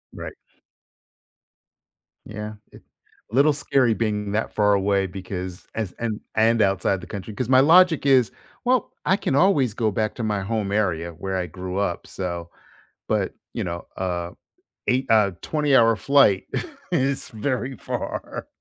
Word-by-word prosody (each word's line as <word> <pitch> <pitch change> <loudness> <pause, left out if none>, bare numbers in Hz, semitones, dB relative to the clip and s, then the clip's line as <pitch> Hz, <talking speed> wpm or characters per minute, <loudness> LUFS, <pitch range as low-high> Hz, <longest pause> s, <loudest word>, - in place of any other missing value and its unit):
Right. - - -7 1.9
Yeah, 105 0 -6 0.2
it - - -15 0.5
A - - -4
little 145 +3 +5
scary 135 -4 +2
being 105 -2 -1
that 110 +1 -1
far 105 -1 +3
away 100 0 +2
because 90 -1 -7
as 110 -5 -2
and 115 -3 -2 0.2
and 115 +1 +3
outside 95 -1 +1
the 85 - -10
country, 100 +3 -7
'cause 120 +3 -3
my 130 -1 +6
logic 165 +1 +5
is, 130 -4 +4 0.3
"Well, 250 -2 +2
I 190 - +3
can 135 - -1
always 140 - +3
go 110 -1 0
back 110 +2 -1
to 120 - -4
my 105 -2 0
home 100 0 -2
area 90 -5 0
where 95 +4 -4
I 90 -1 -2
grew 90 +3 -6
up, 90 -4 -2
so" 85 -2 -5 0.6
but, - - 0 0.2
you - - -2
know, 85 -1 -5
a 90 -2 -2 0.6
8 130 +2 +2
uh, 105 -3 +4
a 85 - -27
20 150 -3 +2
hour 115 -2 +6
flight 135 -8 +4 0.5
is 135 -4 0
very 125 +3 -3
far. - - -5
110 Hz, 160 wpm, -23 LUFS, 95-130 Hz, 1.9 s, my